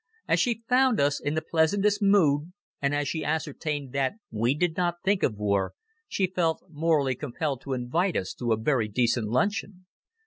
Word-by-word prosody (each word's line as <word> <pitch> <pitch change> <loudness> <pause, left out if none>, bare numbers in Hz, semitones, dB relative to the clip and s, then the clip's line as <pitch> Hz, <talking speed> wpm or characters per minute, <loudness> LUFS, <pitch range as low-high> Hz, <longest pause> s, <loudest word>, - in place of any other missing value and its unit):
As - - +3
she 235 -3 0
found 255 -2 +3
us 140 0 +2
in 145 +1 -2
the 160 - -1
pleasantest 200 +7 +2
mood 175 -5 +3 0.3
and 140 +1 +1
as 145 -1 -1
she 160 - -2
ascertained 150 -3 -3
that 135 -1 0 0.2
we 115 +5 +1
did 160 +1 0
not 175 -1 -1
think 195 0 +2
of 110 - +1
war, 100 -2 0 0.3
she 195 - 0
felt 175 -3 -1
morally 150 -4 +1
compelled 140 +1 -3
to 135 - -4
invite 145 +10 0
us 95 - -3
to 120 -2 -3
a 110 - +3
very 115 0 +1
decent 115 +1 +1
luncheon. 185 - -1
150 Hz, 180 wpm, -27 LUFS, 130-180 Hz, 0.3 s, As